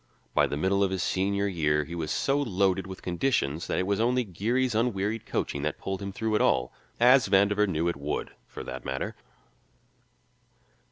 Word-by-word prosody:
By - - +4
the 70 - -3
middle 95 +5 +2
of 100 - +2
his 95 -1 -2
senior 100 +1 0
year 75 -5 +1
he 80 +4 -9
was 80 -3 -3
so 140 - +1
loaded 95 -5 +1
with 95 -1 -9
conditions 85 - 0
that - - -1
it 95 - +1
was 100 +1 0
only 125 +2 +2
Geary's 115 +6 0
unwearied 110 -1 -1
coaching 70 - -2
that 75 +1 -2
pulled 95 0 -4
him 100 0 -4
through 110 +2 -2
at 105 - +3
all 60 0 +2 0.3
as 125 -1 +6
Vandover 100 +1 +4
knew 85 -2 0
it 85 - 0
would, 70 +1 -3 0.2
for - - -8
that - - -7
matter. - - -3
95 Hz, 185 wpm, -27 LUFS, 85-110 Hz, 0.3 s, as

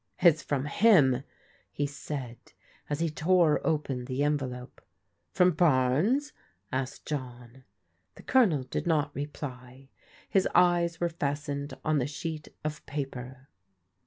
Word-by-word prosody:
It's 170 -3 +5
from 140 -1 -2
him/' 145 - +4 0.5
he 145 - -1
said 140 -4 -6 0.5
as 145 +1 -2
he 165 - +1
tore 165 0 +3
open 140 -6 -1
the 130 +2 -1
envelope. 130 -4 -3 0.5
From 180 -1 +4
Barnes?" 170 - +2 0.4
asked 130 0 -3
John. 125 -3 -6 0.5
The - - -14
Colonel 200 - +3
did 130 - -4
not 150 -3 +1
reply. 135 -2 -7 0.4
His 190 -1 +2
eyes 175 -1 +3
were 175 - +1
fastened 145 -2 -3
on 155 -1 +2
the 125 - 0
sheet 155 +2 -5 0.2
of 155 0 -4
paper. 135 -2 -6
145 Hz, 125 wpm, -29 LUFS, 130-165 Hz, 0.5 s, It's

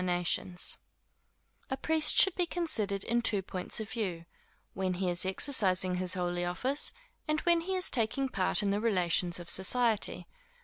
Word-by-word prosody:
_ 180 0 -1 0.9
A 265 - -2
priest 315 +2 +2
should 385 - +7
be 355 -1 -1
considered 220 - -2
in 235 +1 0
two 205 -4 +1
points 185 +4 -3
of 220 0 -6
view; 180 -8 -4 0.5
when 185 -1 -2
he 180 0 -1
is 175 +2 0
exercising 190 -4 +1
his 180 +1 -1
holy 175 -1 -2
office, 255 +12 -1 0.4
and 305 0 +1
when 340 -1 +2
he 375 +3 -3
is 370 - 0
taking 260 +3 +1
part 195 -4 0
in 200 - 0
the 205 +1 -1
relations 180 -5 +1
of 175 - -10
society. 220 +4 +2
200 Hz, 165 wpm, -30 LUFS, 180-265 Hz, 0.9 s, should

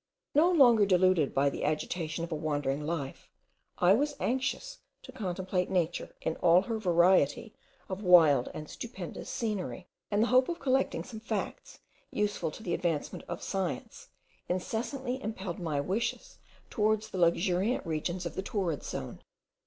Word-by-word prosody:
No 310 +5 +5
longer 245 - +6
deluded 185 -5 +3
by 140 +1 +2
the - - -5
agitation 155 +2 -2
of 170 - -5
a - - 0
wandering 150 -2 -1
life, 155 -5 -4 0.5
I 180 +2 +5
was 290 +6 +1
anxious 270 - -2 0.2
to 260 - -10
contemplate 185 -5 -2
nature 175 -2 -1
in 160 - -2
all 175 +1 +5
her 225 +1 -3
variety 180 0 +3 0.3
of 190 +1 -5
wild 165 -9 +6
and 155 - -7
stupendous 195 -5 -7
scenery; 210 -5 -3 0.2
and 210 +1 +2
the 240 - 0
hope 255 +3 +5
of 340 - -2
collecting 270 0 0
some 220 - -9
facts 220 -2 -5 0.3
useful 205 -5 -1
to 185 - -10
the 175 - -2
advancement 165 -5 -2
of - - -5
science, 190 -4 -4 0.4
incessantly 245 +8 -2
impelled 195 -6 -5
my 160 -5 -1
wishes 190 +11 -2 0.3
towards 215 0 +1
the 185 - -4
luxuriant 180 +6 +2
regions 170 +3 -2
of 170 - -4
the 190 - -3
torrid 190 - -2
zone. - - -6
185 Hz, 155 wpm, -30 LUFS, 170-225 Hz, 0.5 s, longer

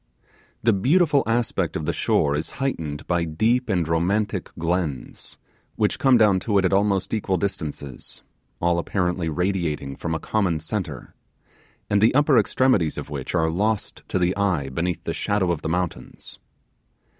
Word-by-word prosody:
The 115 0 +4
beautiful 145 - +3
aspect 115 -6 0
of 80 - -3
the - - 0
shore 70 - +1
is 75 - -3
heightened 80 - -3
by 85 -1 +1
deep 110 +10 +1
and 90 -5 +1
romantic 95 +4 0
glens, 85 -5 -3 0.4
which - - 0
come 135 -2 +5
down 105 -4 +4
to 105 +1 0
it 95 - +3
at 95 - +1
almost 100 0 +1
equal 100 -3 0
distances, 75 -9 -5 0.4
all 85 0 +2
apparently 90 -2 -1
radiating 80 -5 -1
from 80 +2 -3
a - - -2
common 90 -3 0
centre, 80 -4 -5 0.7
and 100 - +2
the 115 +4 +4
upper 145 -3 +5
extremities 105 - +2
of - - -6
which - - -4
are 80 -1 +2
lost 105 +5 -1
to - - -1
the 90 0 +1
eye 90 -9 0
beneath 85 +6 -2
the - - -3
shadow 100 -3 0
of 85 - -2
the - - -3
mountains. 90 0 -4
90 Hz, 160 wpm, -23 LUFS, 80-105 Hz, 0.7 s, come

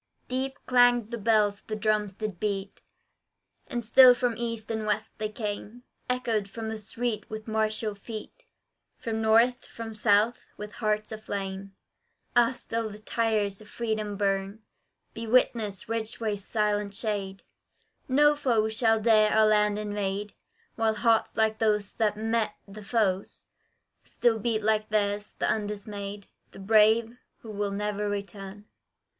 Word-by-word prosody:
Deep 265 +2 -2
clanged 245 -2 +4
the 235 - -3
bells, 210 -1 +2
the 215 - -3
drums 215 -2 0
did 210 -3 -5
beat, 200 -2 -3 0.9
And 240 -1 -3
still 250 +3 +8
from 245 -1 0
east 230 -2 -4
and 220 -1 -2
west 210 - -1
they 215 0 -2
came; 210 +2 -5 0.3
Echoed 230 -5 0
the 220 +1 -5
street 220 +1 -3
with 215 0 -7
martial 220 0 -1
feet, 215 +2 -9 0.5
From 220 -1 -3
north, 230 +3 +4
from 225 -1 -8
south, 215 +2 +2
with 210 0 -7
hearts 215 -1 -1
aflame: 195 -2 -5 0.6
Ah, 240 0 +5
still 230 -2 -3
the 210 - -9
tires 215 -2 0
of 215 - -14
freedom 215 -3 -3
burn, 195 +1 -1 0.5
Be 230 0 -6
witness, 220 -5 +1
Ridgway's 220 -2 -3
silent 210 -1 -1
shade, 200 -3 -3 0.6
No 295 +2 +5
foe 235 -7 +1
shall 225 0 +2
dare 215 -1 +4
our 220 0 +5
land 210 -1 +3
invade, 205 -1 -3 0.4
While 220 -1 +2
hearts 225 0 +2
like 220 0 +2
those 210 -2 +1
that 210 -2 0
met 225 -1 0
the 210 +2 -10
foes, 200 -3 -1 0.6
Still 230 -2 +1
beat 220 0 -1
like 215 0 +1
theirs, 205 -1 -1
the - - 0
undismayed, 205 -1 -4 0.3
The - - -11
brave, 220 +3 +3 0.2
who 205 -2 -3
never 210 +1 -2
will - - -1
return. 200 0 -6
215 Hz, 140 wpm, -27 LUFS, 205-225 Hz, 0.9 s, still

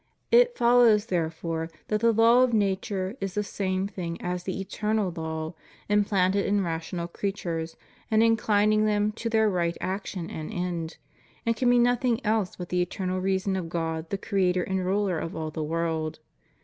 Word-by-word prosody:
It 485 0 +5
follows 235 -3 +5
there 170 -6 0
fore 165 0 -4 0.2
that 215 - +1
the 230 0 +5
law 230 +3 +5
of 255 -2 +3
nature 195 0 -1
is 195 0 -3
the 210 - +1
same 190 -1 -2
thing 175 -4 -5
as 180 0 -3
the 190 0 -3
eternal 210 -1 -1
law, 160 0 -4 0.4
implanted 200 -1 +2
in 200 -1 +1
rational 170 +1 -3
creatures, 170 -3 -4 0.3
and 220 0 +4
inclining 215 -1 +3
them 210 0 +1
to 230 +2 -4
their 220 -1 +3
right 170 -4 0
action 185 -2 -4
and 155 -1 -6
end; 175 -2 -3 0.5
and 230 0 +2
can 245 +2 +2
be 245 - +5
nothing 245 -1 +2
else 215 -3 +1
but 175 -1 -7
the 180 0 +1
eternal 185 +1 -2
reason 190 +1 0
of 175 -3 -3
God, 160 -1 -3
the 200 - -1
Creator 185 -3 +1
and 190 -1 -1
Ruler 190 -2 0
of 165 - -5
all 155 -1 -4
the 155 - -4
world. 160 0 -2
190 Hz, 175 wpm, -27 LUFS, 170-215 Hz, 0.5 s, It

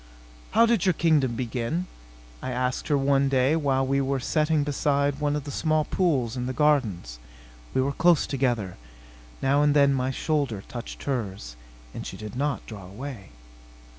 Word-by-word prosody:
"How 230 +3 +6
did 230 -6 +2
your 185 - +5
kingdom 150 -7 +2
begin?" 125 +8 -2 0.6
I - - -4
asked 125 0 -2
her 145 - +2
one 135 0 +2
day, 135 +3 +3
while 135 -4 +1
we 140 +1 +1
were 135 0 0
sitting 150 +3 +1
beside 145 0 0
one 145 -1 0
of 150 - -3
the 145 - -6
small 155 +1 +1
pools 135 -11 0
in 125 -1 -3
the 130 - -2
gardens. 105 - +1 0.6
We 130 - +3
were 135 +2 0
close 170 +2 +4
together. 120 -9 -1 0.7
Now 140 +2 +3
and 145 0 +3
then 140 -1 +5
my 130 -1 0
shoulder 135 -7 -1
touched 120 -1 -8
hers, 100 - -4 0.4
and - - -6
she - - -7
did 105 0 -8
not 145 +2 -1
draw 100 -5 -9
away. 105 0 -8
135 Hz, 170 wpm, -26 LUFS, 125-150 Hz, 0.7 s, How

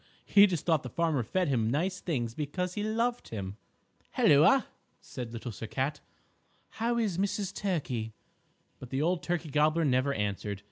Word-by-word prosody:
He 205 0 +7
just 175 -6 -3
thought 160 -4 +3
the 125 - -7
farmer 160 -4 0
fed 180 +10 0
him 115 -5 +1
nice 180 +8 0
things 120 -9 -2
because 175 +7 -3
he 205 - -3
loved 230 +3 -1
him. 100 -2 -6 0.6
"Helloa!" 160 - +6 0.3
said 125 -3 -7
Little 115 +1 -6
Sir 110 +2 -7
Cat, 135 +7 -2 0.7
"how 235 +1 -1
is 205 -7 0
Mrs. 200 0 -1
Turkey?" 135 - -2 0.7
But 125 - -9
the 135 +3 -1
old 175 +1 +1
Turkey 170 -3 -2
Gobbler 155 +3 +3
never 130 0 +2
answered. 105 -3 -2
150 Hz, 160 wpm, -30 LUFS, 125-185 Hz, 0.7 s, He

